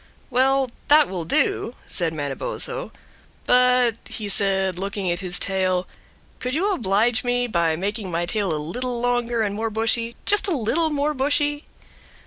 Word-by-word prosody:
"Well, 265 0 +2 0.2
that 300 0 +6
will 180 -3 -4
do," 230 +8 0
said 170 -3 -1
Manabozho. 145 - -2 0.5
"But," 250 -2 +4
he 215 -3 -4
said, 190 -2 +2
looking 195 -1 -2
at 175 - -2
his 180 -2 -2
tail, 185 -2 0 0.5
"could 250 +2 -2
you 395 +5 +1
oblige 225 - +1
me 245 0 0
by 170 -8 +1
making 200 +3 -3
my 170 0 -1
tail 200 0 -1
a 155 - -1
little 240 +11 -3
longer 240 -1 0
and 205 -2 -2
more 225 +2 -2
bushy, 230 +2 0
just 415 0 +4
a 350 -6 +1
little 305 +8 +1
more 295 0 0
bushy?" 290 +2 0
225 Hz, 155 wpm, -22 LUFS, 190-255 Hz, 0.5 s, that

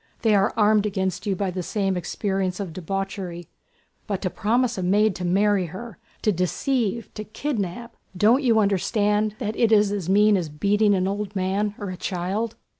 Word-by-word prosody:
They 220 -2 +4
are 200 0 +3
armed 210 -1 +4
against 190 -1 -2
you 195 - +1
by 190 0 -2
the 180 0 -3
same 195 +1 -1
experience 185 +1 -2
of 190 -5 -5
debauchery; 185 -1 -5 0.6
but 200 -3 -2
to 185 - -1
promise 240 +3 +1
a 190 - -3
maid 200 +2 +2
to 180 - -5
marry 195 +1 +2
her... 190 +4 -9 0.2
to 215 - +3
deceive, 225 +5 -1
to 215 - -6
kidnap.... 225 -1 -4 0.2
Don't 225 +8 +4
you 235 -5 +3
understand 210 +1 +1
that 220 -3 -3
it 230 -2 +2
is 210 -2 +4
as 195 -4 -3
mean 210 +1 +5
as 170 -4 -3
beating 200 +7 +2
an 185 0 0
old 205 +1 -3
man 200 +2 -1
or 200 -2 -5
a 180 - -7
child?..." 195 +6 -2
200 Hz, 185 wpm, -24 LUFS, 185-215 Hz, 0.6 s, mean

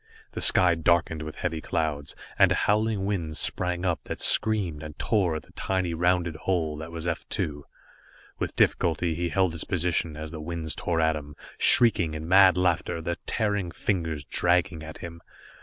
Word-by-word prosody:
The - - -6
sky 90 -1 +7
darkened 80 -1 +1
with 75 0 -7
heavy 80 -3 -3
clouds, 75 -4 -3 0.2
and - - +6
a - - +3
howling 105 -1 +1
wind 85 -6 -2
sprang 90 +2 0
up 85 -9 -1
that - - -6
screamed 100 -9 +1
and 75 -1 -9
tore 95 -7 0
at 80 - -5
the - - -21
tiny 95 -3 -2
rounded 85 0 0
hull 80 -5 0
that 80 +2 -8
was 85 0 -6
F 85 -2 -4
2. 75 -1 -3 0.8
With - - -3
difficulty 85 0 +1
he 85 +2 -2
held 95 0 +1
his 80 - -5
position 85 -4 -1
as 80 0 -7
the 80 -2 -7
winds 80 0 -2
tore 85 -2 -1
at 80 0 +2
him, 75 -1 -8 0.2
shrieking 90 -9 +4
in 80 +1 -6
mad 95 0 +6
laughter, 90 -1 0
their 85 +1 -4
tearing 100 -5 -1
fingers 80 -5 -3
dragging 90 +2 0
at 80 0 -9
him. 85 0 -9
85 Hz, 180 wpm, -26 LUFS, 80-90 Hz, 0.8 s, sky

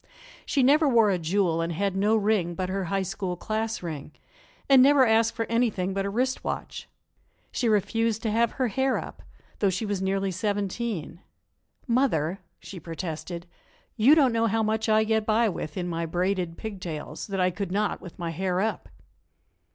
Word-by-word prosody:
She 275 - +2
never 295 +3 +5
wore 225 -5 +4
a 185 - 0
jewel 170 0 +1
and 165 +1 -2
had 195 +3 -1
no 205 +3 +2
ring 205 -5 +1
but 185 +1 -3
her 190 0 -2
High 195 +2 -1
School 190 -1 -3
class 220 +1 -3
ring, 155 -3 -6 0.5
and 270 -2 +7
never 275 0 +6
asked 225 0 +3
for 225 - -1
anything 220 -6 0
but 195 0 -1
a - - -2
wrist 255 +5 -1
watch. - - -5 0.6
She 240 - 0
refused 220 +2 +1
to 220 - 0
have 230 +2 +2
her 255 -3 0
hair 265 +4 +1
up; - - -7 0.4
though 200 - +3
she 190 +4 -2
was 205 -2 -2
nearly 195 0 0
seventeen. 200 -2 -3 0.6
"Mother," 200 - +1 0.2
she 190 - -9
protested, 165 +1 -6 0.5
"you 255 +8 +6
don't 270 -6 +4
know 230 0 +2
how 225 +1 +1
much 220 +1 0
I 215 0 +4
get 220 0 +1
by 225 +2 +2
with, 155 -4 -5
in 180 -1 -2
my 165 -1 -2
braided 180 0 -1
pigtails, 185 -8 -6
that 195 -2 -3
I 180 0 +3
could 195 0 -4
not 210 +2 -1
with 180 - -11
my 170 -2 -3
hair 180 +2 -1
up." 220 +3 -2
200 Hz, 180 wpm, -26 LUFS, 180-225 Hz, 0.6 s, and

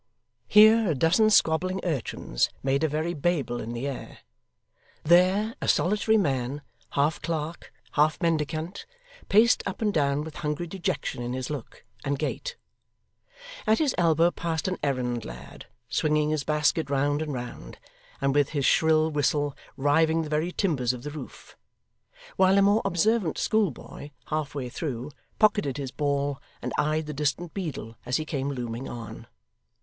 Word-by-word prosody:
Here, 215 0 +7
a 155 - +1
dozen 175 - +4
squabbling 185 -1 +3
urchins 135 - -1
made 135 +2 +1
a - - +4
very 155 +3 -1
Babel 145 -6 -1
in 115 - -5
the 120 +4 -3
air; 140 - -7 0.8
there, 185 +6 +4
a - - -2
solitary 210 +4 +3
man, 140 - -1 0.3
half 145 +3 +1
clerk, 165 0 -4 0.2
half 155 +1 +2
mendicant, 160 - -2 0.4
paced 225 +4 +5
up 190 - -4
and 210 -2 0
down 140 -1 +1
with 155 -1 -9
hungry 150 +3 -2
dejection 170 -7 -3
in 120 +1 -3
his 130 +2 -4
look 145 -6 -7 0.2
and 140 0 -1
gait; - - -3 1.1
at 220 +1 +4
his 295 -5 +1
elbow 170 0 +3
passed 165 -2 -3
an 185 - -2
errand 125 -4 -1
lad, - - -10 0.2
swinging 150 0 +1
his 155 -2 0
basket 150 0 +1
round 145 +2 +1
and 155 -1 -3
round, 120 - -7 0.4
and 135 0 +1
with 145 -1 +3
his 140 -3 -1
shrill 160 +1 +4
whistle 145 -1 0 0.2
riving 160 +3 +3
the 155 - -6
very 155 +4 0
timbers 140 - 0
of 125 -1 -8
the 150 - -5
roof; 155 - -10 0.8
while 190 +1 +5
a - - +6
more 205 +3 +4
observant 195 0 +1
schoolboy, 195 - -1 0.2
half 150 -2 -2
way 135 -3 -3
through, 130 0 -4 0.3
pocketed 205 -10 +2
his 135 -3 -4
ball, 140 -1 -1 0.2
and - - -4
eyed 155 +1 +1
the 150 - -5
distant 150 +4 -2
beadle 150 - -5
as 125 - 0
he 155 - -3
came 140 -3 -2
looming 125 -2 -4
on. 115 -2 -8
150 Hz, 155 wpm, -26 LUFS, 140-175 Hz, 1.1 s, Here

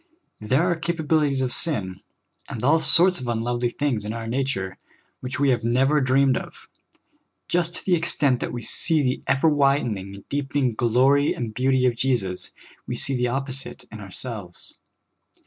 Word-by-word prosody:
There 130 +9 +1
are 175 -1 +1
capabilities 160 -4 0
of 130 -1 -1
sin, 95 - -1 0.5
and 115 - -6
all 155 +5 +4
sorts 180 +2 +4
of 125 - -6
unlovely 120 +1 -1
things 125 -4 -1
in 105 +1 -4
our 115 -1 -5
nature, 115 -6 -3 0.4
which 130 +2 -5
we 140 -1 +3
have 120 -2 0
never 135 +6 +2
dreamed 130 0 +3
of. - - -9 0.8
Just 175 0 0
to - - -2
the 185 - +2
extent 150 -6 +1
that - - -4
we 120 -1 -6
see 160 -3 +2
the 130 0 -1
ever 140 +4 +2
widening, 120 -10 0
deepening 140 -3 -1
glory 130 +6 +2
and 115 -3 -5
beauty 130 +1 +1
of 125 -2 +2
Jesus, 115 -8 -1 0.4
we - - -3
see 135 - +2
the 125 0 0
opposite 135 +1 -5
in 110 - -9
ourselves. 100 -2 -1
130 Hz, 165 wpm, -23 LUFS, 115-145 Hz, 0.8 s, all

